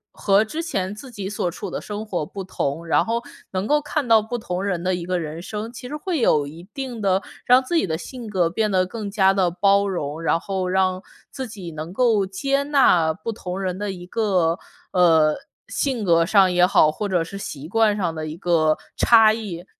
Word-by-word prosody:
和 200 +2 +3
之 315 +9 -4
前 190 - -2
自 260 +4 -10
己 200 -4 -5
所 200 -3 -2
处 190 +2 -6
的 - - -4
生 210 +1 -6
活 180 -7 -2
不 195 +5 -7
同， 165 -3 -3
然 - - +3
后 235 +1 -2 0.3
能 190 +1 -2
够 295 +3 +3
看 295 -2 -2
到 225 -1 +6
不 240 +3 -4
同 180 -4 -4
人 180 -4 -2
的 185 - +1
一 170 - -5
个 180 0 -1
人 160 +1 -6
生， 215 +5 -5
其 250 +1 -8
实 295 - -5
会 345 -2 -2
有 150 -10 +3
一 160 +4 -10
定 255 -5 -5
的 195 -1 +2 0.2
让 250 +1 +5
自 300 +7 -3
己 320 - +2
的 160 0 -1
性 240 +4 -8
格 185 -5 +2
变 215 +4 0
得 185 -1 +2
更 205 +1 -6
加 195 -2 +3
地 185 -3 +2
包 200 +3 +3
容， 160 -4 -3
然 165 0 +1
后 190 0 -3
让 185 0 +1 0.3
自 265 -2 -5
己 190 -6 -8
能 155 +2 -7
够 215 -2 +2
接 275 +9 0
纳 260 - +4
不 160 +8 -5
同 185 -2 -6
人 185 -1 -3
的 205 -1 -2
一 175 -2 -9
个， 185 -5 +1 0.3
呃， 160 -4 +4 0.3
性 260 -6 -1
格 170 -3 +4
上 190 0 +4
也 175 0 +4
好， 170 -4 +5
或 205 +6 -4
者 175 -3 +1
是 195 +4 -8
习 150 -6 -7
惯 215 +2 +2
上 175 -4 -1
的 155 -1 -5
一 155 +2 -6
个 160 -4 +2 0.2
差 220 -2 +6
异。 190 -6 -6
190 Hz, 235 characters per minute, -22 LUFS, 175-220 Hz, 0.3 s, 到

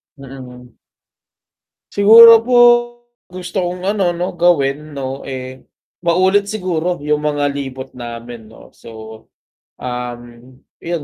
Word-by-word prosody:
Mm. 125 -3 -13 1.1
Siguro 225 +2 +7
po, 245 +1 +1 0.7
gusto 185 +2 -8
kong 180 +1 -5
ano 190 -4 0
'no 175 +1 -4
gawin 155 -4 0
'no, 135 0 -6
eh, 130 -1 -8 0.4
maulit 185 +4 +2
siguro 180 -4 -3
yung 150 +1 -2
mga 145 -1 -1
libot 135 -1 -7
namin 120 -2 -10
'no. - - -17
So, 115 - -14 0.9
um 125 -1 -6 0.6
yon, 170 -2 -5
150 Hz, 110 wpm, -16 LUFS, 130-180 Hz, 1.1 s, Siguro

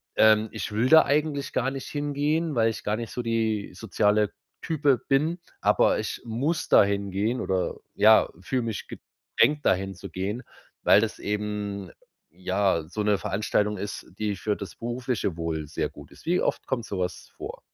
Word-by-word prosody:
ähm, 110 0 +5
ich - - -5
will 115 +5 +1
da 160 0 +9
eigentlich 145 -1 0
gar 130 +2 +1
nicht 135 -1 -6
hingehen, 145 +2 -1
weil 115 -1 +3
ich 110 - -6
gar 105 - 0
nicht 115 0 -5
so 125 - -3
die 110 -2 -1
soziale 105 +1 +1 0.3
Type 145 -6 +2
bin, 155 +6 +2 0.2
aber - - +3
ich - - -4
muss 135 +9 -1
dahin 100 -1 +4
gehen 110 +6 0
oder, 95 -1 -1 0.2
ja, - - +6
fühle 125 +6 -1
mich 110 -4 -4
gedrängt, 145 -1 -1
dahin 95 +1 +1
zu 85 - -9
gehen, 100 +7 -3 0.4
weil - - +7
das 110 0 -2
eben, 105 -2 -3 0.4
ja, 95 -1 0
so 105 +6 -4
'ne 105 -1 +3
Veranstaltung 105 +1 0
ist, 100 +2 -5
die 105 -1 -1
für 105 +1 -1
das 100 - -8
berufliche 120 -6 -2
Wohl 80 -2 -3
sehr 75 - -2
gut - - -14
ist.“ - - -17
Wie 175 +2 +2
oft - - -1
kommt 120 -4 -2
so 100 - -4
was 90 0 -4
vor? - - -7
110 Hz, 175 wpm, -26 LUFS, 100-130 Hz, 0.4 s, da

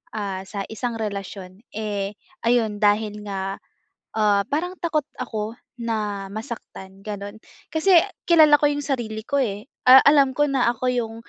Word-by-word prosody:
ah, 200 -3 -3
sa 200 +1 -4
isang 235 +2 -3
relasyon. 195 -3 -6 0.2
Eh, 205 -2 -3 0.3
ayon 230 -3 +2
dahil 210 0 +2
nga, 195 -1 -4 0.6
ah, 205 -2 +3
parang 350 +6 -2
takot 315 -3 0 0.2
ako 220 -3 -4 0.3
na 210 -4 -2
masaktan, 215 -4 -8
gano'n. 205 0 -6 0.4
Kasi 345 +3 +5 0.3
kilala 310 -3 +7
ko - - +4
yung 290 0 -3
sarili 235 -6 -3
ko, 280 - +1
eh, 210 0 -4 0.2
ah, 260 +1 +11
alam 285 -2 +6
ko 295 +2 +3
na 260 -3 +2
ako 245 +2 -3
yung, 225 -2 -2
220 Hz, 150 wpm, -23 LUFS, 205-265 Hz, 0.6 s, ah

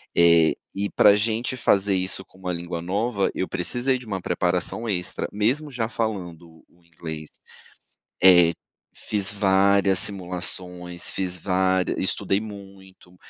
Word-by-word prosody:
Eh, 85 -2 +5 0.2
e 100 +1 -2
pra 100 -1 +5
gente 115 +4 -1
fazer 100 -4 +2
isso 95 +1 -2
com - - -23
uma 90 -1 -3
língua 85 0 -5
nova, 100 +4 -1
eu 95 - -2
precisei 125 +8 -1
de 125 - -11
uma 100 -4 -4
preparação 90 +6 -1
extra, 90 -3 -2
mesmo 130 +9 0
já 120 -4 -2
falando 90 -8 -5
o 85 - -29
inglês. 80 -2 -8 0.9
É. 90 -3 +7 0.4
Fiz 100 -1 -1
várias 100 -1 +3
simulações, 90 -2 -2
fiz 90 -1 -2
vária 95 -1 +1
estudei 95 - -1
muito, 95 -3 -12
95 Hz, 130 wpm, -24 LUFS, 90-105 Hz, 0.9 s, É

